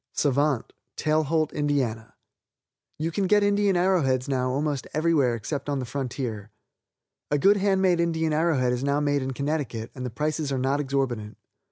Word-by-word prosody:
Savant, 140 Hz, -2 st, +1 dB, 0.2 s
Tailholt, 155 Hz, 0 st, +1 dB
Ind.: 145 Hz, -1 st, -1 dB, 1.3 s
You 160 Hz, +2 st, -2 dB
can 195 Hz, +3 st, 0 dB
get 205 Hz, +1 st, +4 dB
Indian 205 Hz, -2 st, +2 dB
arrow 185 Hz, 0 st, +3 dB
heads 130 Hz, -2 st, 0 dB
now 130 Hz, -2 st, 0 dB
almost 140 Hz, +1 st, -1 dB
anywhere 155 Hz, -6 st, +2 dB
except 140 Hz, +7 st, -4 dB
on 140 Hz, -, 0 dB
the 130 Hz, -, -3 dB
frontier. 120 Hz, -5 st, -4 dB, 0.8 s
A 145 Hz, -, +2 dB
good 200 Hz, +7 st, +5 dB
hand 195 Hz, -1 st, +2 dB
made 180 Hz, -2 st, +3 dB
Indian 160 Hz, -2 st, 0 dB
arrow 160 Hz, 0 st, +2 dB
head 125 Hz, -1 st, +1 dB
is 125 Hz, +1 st, -2 dB
now 140 Hz, +1 st, +1 dB
made 145 Hz, -1 st, +1 dB
in 130 Hz, -, -3 dB
Connecticut, 140 Hz, -5 st, -3 dB
and 130 Hz, -, -7 dB
the 125 Hz, -, -3 dB
prices 150 Hz, +4 st, -2 dB
are 135 Hz, -, 0 dB
not 135 Hz, +3 st, 0 dB
exorbitant. 130 Hz, -6 st, -2 dB
145 Hz, 175 wpm, -25 LUFS, 130-160 Hz, 1.3 s, good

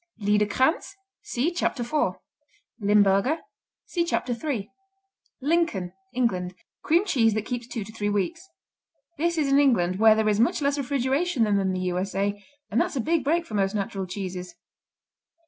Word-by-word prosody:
Liederkranz 210 Hz, -, +1 dB, 0.3 s
see 270 Hz, +8 st, -1 dB
Chapter 315 Hz, -7 st, -1 dB
4. 295 Hz, +6 st, -1 dB, 0.6 s
Limburger 205 Hz, +6 st, +3 dB, 0.5 s
see 345 Hz, -, -1 dB
Chapter 295 Hz, -7 st, -1 dB
3. 235 Hz, -5 st, -3 dB, 0.8 s
Lincoln 285 Hz, -, 0 dB, 0.2 s
England 190 Hz, -8 st, -1 dB, 0.3 s
Cream 340 Hz, +5 st, +2 dB
cheese 225 Hz, -, +2 dB
that 215 Hz, 0 st, -2 dB
keeps 245 Hz, -1 st, -4 dB
two 235 Hz, -3 st, -4 dB
to 215 Hz, +2 st, -12 dB
three 205 Hz, -2 st, -2 dB
weeks. 330 Hz, -, -2 dB, 0.7 s
This 340 Hz, +1 st, +1 dB
is 295 Hz, -3 st, +1 dB
in 280 Hz, -, +6 dB
England, 190 Hz, -10 st, +2 dB
where 220 Hz, 0 st, +7 dB
there 220 Hz, 0 st, +1 dB
is 210 Hz, -1 st, +2 dB
much 235 Hz, -, +3 dB
less 285 Hz, 0 st, 0 dB
refrigeration 275 Hz, +2 st, 0 dB
than 205 Hz, -2 st, +2 dB
in 190 Hz, -1 st, 0 dB
the 185 Hz, 0 st, -2 dB
U.S.A., 195 Hz, +3 st, -2 dB, 0.3 s
and 235 Hz, +4 st, +3 dB
that's -, -, -1 dB
a -, -, 0 dB
big 320 Hz, +4 st, +1 dB
break 330 Hz, +5 st, +1 dB
for 220 Hz, -, -11 dB
most 195 Hz, 0 st, +1 dB
natural 195 Hz, -2 st, -3 dB
cheeses. 180 Hz, -1 st, -6 dB
225 Hz, 160 wpm, -25 LUFS, 200-285 Hz, 0.8 s, where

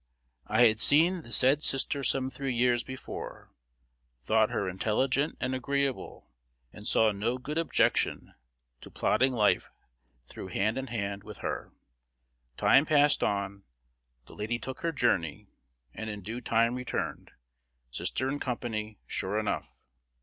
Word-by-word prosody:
I 110 Hz, +3 st, +5 dB
had 110 Hz, -1 st, +3 dB
seen 170 Hz, +8 st, +5 dB
the 120 Hz, -, -13 dB
said 135 Hz, +6 st, +4 dB
sister 140 Hz, 0 st, +2 dB
some 130 Hz, 0 st, +1 dB
three 135 Hz, -2 st, -3 dB
years 120 Hz, 0 st, +3 dB
before, 130 Hz, 0 st, -8 dB, 0.7 s
thought 110 Hz, 0 st, +3 dB
her 100 Hz, -, -2 dB
inteligent 125 Hz, -, 0 dB
and 130 Hz, +1 st, -1 dB
agreeable, 140 Hz, +1 st, -2 dB, 0.5 s
and 105 Hz, 0 st, -8 dB
saw 110 Hz, -1 st, +4 dB
no 110 Hz, +5 st, -1 dB
good 150 Hz, +5 st, -3 dB
objection 165 Hz, -, +1 dB, 0.5 s
to -, -, -12 dB
plodding 130 Hz, +1 st, +2 dB
life 110 Hz, -5 st, +2 dB, 0.6 s
through 80 Hz, -, -9 dB
hand 105 Hz, +7 st, 0 dB
in 135 Hz, -, -5 dB
hand 100 Hz, -4 st, -4 dB
with 105 Hz, 0 st, -10 dB
her. -, -, -4 dB, 0.9 s
Time 140 Hz, +3 st, +5 dB
passed 145 Hz, -1 st, +4 dB
on, 100 Hz, -1 st, -1 dB, 0.6 s
the -, -, -15 dB
lady 110 Hz, +3 st, -2 dB
took 130 Hz, +3 st, -7 dB
her 170 Hz, -, -1 dB
journey, 85 Hz, -, 0 dB, 0.5 s
and 110 Hz, 0 st, -6 dB
in 105 Hz, -2 st, -6 dB
due 115 Hz, +5 st, -5 dB
time 115 Hz, 0 st, +2 dB
returned, 125 Hz, 0 st, -4 dB, 0.6 s
sister 130 Hz, -, -2 dB
in 145 Hz, +2 st, -2 dB
company, 110 Hz, -4 st, -4 dB
sure 100 Hz, +3 st, -2 dB
enough. 110 Hz, -1 st, -2 dB
120 Hz, 140 wpm, -29 LUFS, 105-135 Hz, 0.9 s, I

